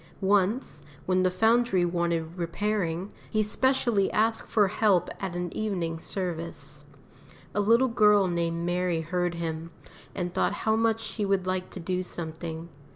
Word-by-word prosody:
Once, 195 - +1 0.2
when 185 0 +2
the 185 - +3
Foundry 220 -1 +3
wanted 170 -1 -1
repairing, 180 +1 -2 0.2
he 215 0 +1
specially 235 -2 +2
asked 225 +1 +1
for 210 -3 +4
help 190 -3 +2
at 190 -3 -4
an 175 -1 -4
evening 175 -7 -2
service. 165 -6 -5 0.7
A 205 - +1
little 230 +5 +4
girl 210 -4 +4
named 170 -1 -1
Mary 175 -1 0
heard 175 +1 -1
him, 165 -1 -4 0.5
and 180 -1 -3
thought - - +1
how 220 0 +4
much 225 0 +1
she 220 -1 -4
would 195 -2 +1
like 185 0 -2
to - - -8
do 180 +1 -1
something. 165 -1 -6
185 Hz, 150 wpm, -27 LUFS, 170-210 Hz, 0.7 s, for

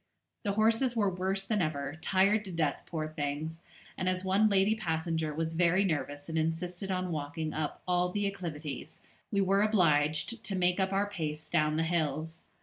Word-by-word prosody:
The 200 -3 -1
horses 225 +4 +2
were 205 -4 +2
worse 190 +2 -1
than 210 -1 +1
ever, 145 -2 -2
tired 200 +3 +3
to 190 - -6
death, 160 -4 0
poor 155 -2 -3
things; 155 +1 -4 0.3
and 185 - 0
as 185 0 -2
one 200 +3 +4
lady 200 +1 +4
passenger 160 -5 -1
was 160 +2 -2
very 175 +3 +3
nervous 145 -4 -2
and 160 -1 -1
insisted 175 +4 -2
on 185 -1 -1
walking 155 +1 -3
up 155 -1 -3
all 180 0 +2
the 205 +1 -1
acclivities, 160 -8 -5 0.3
we 200 - +2
were 195 +1 +3
obliged 175 0 +2
to 195 -1 -1
make 180 +1 +2
up 190 0 +1
our 200 +1 +1
pace 155 -6 -4
down 150 0 +2
the 160 - +1
hills. 160 -1 -1
175 Hz, 180 wpm, -31 LUFS, 155-195 Hz, 0.3 s, one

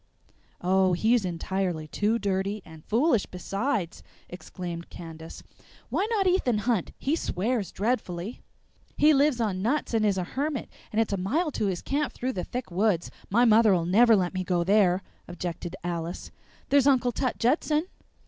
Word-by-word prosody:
"Oh, 185 +1 +3
he's 220 +4 +2
entirely 180 -2 -2
too 210 +8 0
dirty, 200 -1 -2
and 160 -2 -13
foolish 235 -1 +2
besides!" 195 +1 -3 0.3
exclaimed 175 -1 -7
Candace. 165 -1 -10 0.5
"Why 405 - 0
not 425 -4 +1
Ethan 360 - +2
Hunt? 230 -8 0
He 285 +4 0
swears 215 - -1
dreadfully." 205 -2 -2 0.6
"He 305 +1 +6
lives 280 -2 +3
on 200 -5 -1
nuts 245 +5 0
and 225 -1 +2
is 205 -2 +2
a 185 - 0
hermit, 280 -2 -2 0.2
and 215 - 0
it's 225 -2 +1
a - - 0
mile 290 - 0
to 210 - -1
his 185 -3 -3
camp 285 +1 -1
through 255 +1 -3
the 180 - -3
thick 250 -5 -5
woods; 185 -1 +1 0.2
my 235 +5 +4
mother'll 215 -6 +5
never 225 +6 +5
let 180 -2 0
me 185 0 -2
go 175 -1 0
there," 190 -1 +3 0.2
objected 175 0 -5
Alice. 170 0 -4 0.4
"There's 280 -1 +4
Uncle 255 -3 +3
Tut 255 +2 -2
Judson." 300 +5 +1
205 Hz, 160 wpm, -27 LUFS, 180-250 Hz, 0.6 s, He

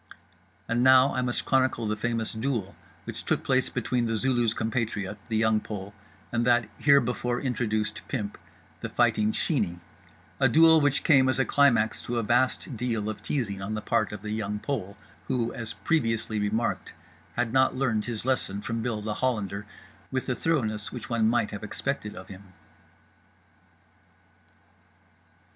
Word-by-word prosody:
And 120 +2 +1
now 130 +1 +6
I 130 - 0
must 125 -1 -1
chronicle 130 -3 +2
the 105 0 0
famous 115 +1 -2
duel 110 -4 -2 0.3
which - - -6
took - - 0
place - - +2
between 120 -2 -1
The 115 - 0
Zulu's 120 -2 +2
compatriot, 110 -3 -2
The 110 - +1
Young 110 -1 +3
Pole, 100 -2 -7 0.4
and 120 0 +1
that 120 -2 +3
herebefore 125 -3 +3
introduced 110 -5 -1
pimp, 105 -1 -4 0.4
The - - -5
Fighting 105 0 +2
Sheeney; 100 - -1 0.6
a - - +4
duel 160 0 +6
which 145 -1 +2
came 135 -4 +5
as 130 - +1
a 135 - +2
climax 120 -6 +3
to 120 - -3
a 115 - 0
vast 120 +3 +1
deal 110 -2 -2
of 105 - -10
teasing 105 -5 -2
on 105 +3 -3
the - - -2
part - - 0
of 105 -2 -7
The 105 - -4
Young 105 -1 -2
Pole—who, 110 +1 -4
as 115 -2 -5
previously 115 -8 0
remarked, 105 +3 -1 0.4
had 120 -1 -1
not 130 0 +4
learned 115 -5 0
his 115 -2 -4
lesson 125 -6 0
from 115 +1 -3
Bill 110 -3 -2
The 105 0 -2
Hollander 105 -5 -2 0.4
with 130 -1 -2
the 130 - 0
thoroughness 110 -9 -1
which 125 -1 -7
one 110 -2 +3
might 120 -3 +1
have 105 - -6
expected 105 0 -3
of 95 - -10
him. 95 0 -13
115 Hz, 160 wpm, -27 LUFS, 105-130 Hz, 0.6 s, now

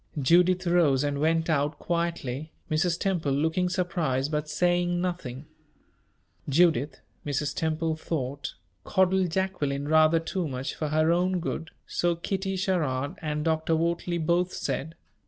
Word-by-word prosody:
Judith 180 +6 +4
rose 165 -6 +3
and 145 -1 -1
went 160 +1 +2
out 150 -2 +1
quietly, 165 -4 -2 0.2
Mrs. 170 +2 +1
Temple 170 -8 0
looking 160 +5 +1
surprised, 165 -7 -1
but 150 0 -2
saying 175 +2 +1
nothing. 165 -7 -4 1.0
Judith, 145 -3 +2 0.2
Mrs. 145 0 -2
Temple 160 0 0
thought, 140 -4 -4 0.3
coddled 190 -1 +2
Jacqueline 155 -6 -1
rather 155 +1 +5
too 165 +1 -3
much 130 0 -4
for 155 - -3
her 155 +2 +2
own 180 +1 +2
good, 165 -1 -4 0.2
so 175 -1 0
Kitty 190 +3 -2
Sherrard 150 -8 0
and 150 -1 -2
Dr. 160 0 +1
Wortley 170 +1 0
both 170 +2 +1
said. 160 +3 -3
160 Hz, 135 wpm, -27 LUFS, 145-175 Hz, 1.0 s, rather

